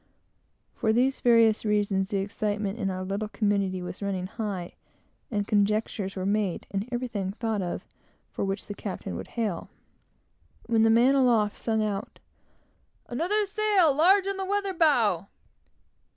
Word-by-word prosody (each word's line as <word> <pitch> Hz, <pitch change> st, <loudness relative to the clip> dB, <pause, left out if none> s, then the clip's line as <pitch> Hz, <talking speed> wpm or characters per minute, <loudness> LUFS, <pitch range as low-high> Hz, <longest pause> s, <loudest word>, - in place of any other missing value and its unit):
For 220 Hz, -, 0 dB
these 255 Hz, +4 st, +2 dB
various 230 Hz, -2 st, +4 dB
reasons, 205 Hz, -2 st, +1 dB
the 205 Hz, -, -1 dB
excitement 205 Hz, +1 st, -2 dB
in 195 Hz, -3 st, 0 dB
our 185 Hz, 0 st, -3 dB
little 200 Hz, +3 st, -3 dB
community 200 Hz, -4 st, 0 dB
was 180 Hz, -, -7 dB
running 195 Hz, -2 st, -2 dB
high, 195 Hz, -3 st, -5 dB, 0.6 s
and 205 Hz, -3 st, -2 dB
conjectures 205 Hz, -1 st, 0 dB
were 185 Hz, -1 st, -3 dB
made, 200 Hz, -3 st, 0 dB
and 200 Hz, +4 st, -3 dB
everything 230 Hz, -6 st, -3 dB
thought 220 Hz, -2 st, -2 dB
of 175 Hz, -1 st, -4 dB, 0.5 s
for -, -, -3 dB
which 195 Hz, 0 st, -3 dB
the 205 Hz, -, -6 dB
captain 190 Hz, -, -6 dB
would -, -, -6 dB
hail, 210 Hz, -7 st, -2 dB, 1.0 s
when 230 Hz, -1 st, +2 dB
the 225 Hz, -, +5 dB
man 235 Hz, +4 st, +5 dB
aloft 235 Hz, -6 st, +3 dB
sung 220 Hz, -1 st, 0 dB
out 205 Hz, -1 st, -3 dB, 0.9 s
"Another 365 Hz, -, +1 dB
sail, 405 Hz, -6 st, +3 dB
large 375 Hz, +7 st, +4 dB
on 395 Hz, 0 st, -2 dB
the 385 Hz, -, -2 dB
weather 400 Hz, 0 st, -1 dB
bow!" 235 Hz, -, +2 dB
215 Hz, 150 wpm, -27 LUFS, 195-245 Hz, 1.0 s, the